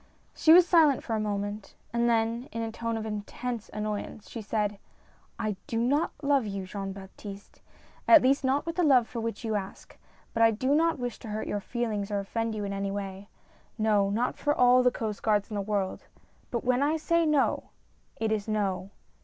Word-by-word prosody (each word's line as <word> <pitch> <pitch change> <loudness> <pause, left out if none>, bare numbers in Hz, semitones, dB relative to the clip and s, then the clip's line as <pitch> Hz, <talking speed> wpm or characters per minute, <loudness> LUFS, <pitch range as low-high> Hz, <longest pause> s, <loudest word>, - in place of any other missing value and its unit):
She 315 - +4
was 350 +1 +8
silent 315 -7 +5
for 230 - -3
a - - 0
moment, 205 0 -3 0.2
and 235 0 +2
then, 230 +2 0
in 230 0 -3
a 225 - -3
tone 230 0 -3
of 220 - -4
intense 220 +2 -5
annoyance, 210 0 -4
she 230 - -7
said: 210 -1 -1 0.6
"I 215 -3 -2
do 225 - -2
not 275 +7 +1
love 280 -5 +2
you, 195 -1 -4
Jean 195 +1 -5
Baptiste, 195 +1 -10 0.5
at 330 -5 +8
least 275 +2 +3
not 265 +2 +1
with 335 +1 -4
the 355 - +3
love 260 -7 +5
for 235 - -5
which 225 -1 -4
you 220 - -1
ask; 195 -2 -5 0.4
but 230 - 0
I 225 - +7
do 255 +5 0
not 325 +2 +3
v^ish 245 -2 -4
to 235 - -10
hurt 215 0 -3
your 205 - -2
feelings 215 -2 -3
or 205 - -1
offend 225 +3 -2
you 210 - -3
in 200 0 -3
any 195 0 -2
way. 195 0 -5 0.5
No, 210 -3 +2
not 230 +5 0
for 295 0 +1
all 250 0 +6
the 250 - +5
Coast 220 -4 -4
Guards 210 -1 +1
in - - -3
the 200 - -1
world, 200 -2 -2 0.4
but 235 - -2
when 250 +1 +2
I 300 +3 +2
say 335 +2 +2
no, 300 -3 +1 0.5
it 220 -1 -1
is 215 -1 -1
no. 195 -3 -1
225 Hz, 205 wpm, -28 LUFS, 205-250 Hz, 0.6 s, was